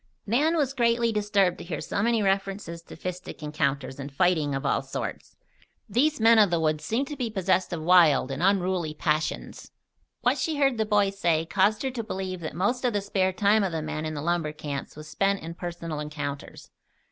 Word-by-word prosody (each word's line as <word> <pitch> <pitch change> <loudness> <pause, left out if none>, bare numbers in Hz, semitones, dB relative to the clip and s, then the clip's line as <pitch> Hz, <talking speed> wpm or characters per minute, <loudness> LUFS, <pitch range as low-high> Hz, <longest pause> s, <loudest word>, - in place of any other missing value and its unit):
Nan 295 +10 +2
was 275 -3 +1
greatly 235 -2 +2
disturbed 205 -4 +1
to - - -7
hear 170 -1 -4
so - - -2
many 230 0 +2
references 195 -3 -1
to - - -12
fistic 180 -3 -7
encounters 140 -3 -2
and 140 +1 -6
fighting 155 -2 +1
of 135 +1 -4
all 140 - +2
sorts. - - -6 0.5
These 265 +8 +1
men 225 0 +6
of 205 -3 +6
the 170 -1 +1
woods 155 -1 0
seemed 230 - 0
to 295 - -5
be 250 -4 -2
possessed 190 -3 0
of 165 -3 -4
wild 160 -6 +5
and 135 +4 -4
unruly 185 -4 +1
passions. 155 0 -2 0.5
What - - +2
she 315 -2 -1
heard 270 -5 +2
the 220 - +1
boys 200 -2 +2
say 165 -3 +2
caused 200 +6 +2
her 265 - -1
to 240 -3 -4
believe 190 -3 -4
that 155 -2 -6
most 220 +9 0
of 245 -2 +1
the 205 - 0
spare 190 -1 0
time 205 +3 +3
of 190 - -1
the 160 -1 -3
men 155 0 -3
in 155 - -4
the 145 - -4
lumber 170 -2 0
camps 145 -2 -6
was 155 +1 -10
spent 195 +5 0
in 165 +1 -6
personal 170 -3 -5
encounters. 145 -2 -6
185 Hz, 205 wpm, -26 LUFS, 155-210 Hz, 0.5 s, men